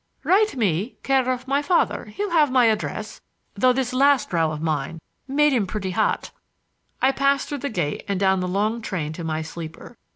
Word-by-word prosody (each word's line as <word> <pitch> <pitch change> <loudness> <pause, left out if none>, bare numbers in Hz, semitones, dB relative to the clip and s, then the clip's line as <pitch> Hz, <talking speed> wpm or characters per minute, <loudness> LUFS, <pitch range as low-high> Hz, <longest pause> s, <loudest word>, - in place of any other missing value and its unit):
"Write 420 -1 +3
me, 205 -1 0
care 265 -2 +2
of 255 +1 -2
my 280 +2 +1
father—he'll 365 +5 0
have 305 -5 +4
my 255 -2 +5
address, 215 -1 -2 0.3
though 255 +6 +3
this 255 -1 -1
last 275 -4 +3
row 165 -2 +2
of 155 - -5
mine 155 0 -2 0.3
made 295 +2 +3
him 220 -6 +1
pretty 190 -1 -3
hot." - - 0 0.7
I 265 - +5
passed 275 0 +1
through 290 - -3
the 280 - -3
gate 170 -10 -2
and 200 -2 -1
down 190 -1 +3
the 180 - -2
long 210 +5 0
train 165 -8 -3
to 170 - -7
my 160 0 -2
sleeper. 160 +7 -9
225 Hz, 190 wpm, -23 LUFS, 180-270 Hz, 0.7 s, my